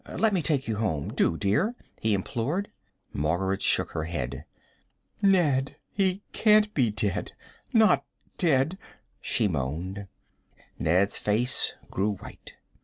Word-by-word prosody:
Let 220 -2 +3
me 185 - +2
take 145 -4 0
you 110 -2 -1
home, 85 -10 -1
do, 80 - +2
dear," 105 - +1 0.2
he 110 -2 +2
implored. 130 - -2 0.4
Margaret 90 +6 0
shook - - +1
her 80 - -3
head. 70 -4 -4 0.8
"Ned, 155 -9 +3 0.2
he 195 0 0
can't 210 -1 +4
be 125 -6 +2
dead 105 -2 -2 0.4
not 220 -2 +5 0.4
dead!" 160 +1 +2 0.4
she 110 - +1
moaned. 90 +6 -3 0.7
Ned's 90 +5 +2
face 115 +5 +1 0.2
grew 100 +2 0
white. - - -12
110 Hz, 120 wpm, -27 LUFS, -, 0.8 s, not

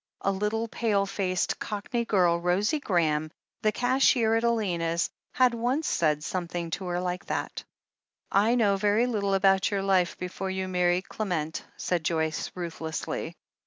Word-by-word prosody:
A 195 - +1
little 210 +4 -1
pale 210 -4 +1
faced, 190 -2 -1
Cockney 225 +3 -3
girl, 175 -5 +3
Rosie 190 - +1
Graham, 155 - +1 0.3
the 215 - +3
cashier 245 -2 +3
at 225 +1 +2
Elena's, 175 -8 0 0.2
had 255 -2 +4
once 250 +7 0
said 150 -2 +1
something 175 -1 -3
to 190 +3 -3
her 175 0 -1
like 180 +1 -3
that. - - -3 0.7
"I 215 +5 +4
know 205 -5 +3
very 210 +4 +3
little 200 -5 0
about 195 0 +4
your 200 -2 -1
life 185 -3 +2
before 185 +1 -4
you 190 0 -2
mar 180 -1 +1
ried 175 +1 +1
Clement," 165 -7 -3
said 175 -3 -1
Joyce 160 -1 -1
ruthlessly. 165 -3 -4
195 Hz, 155 wpm, -27 LUFS, 175-215 Hz, 0.7 s, had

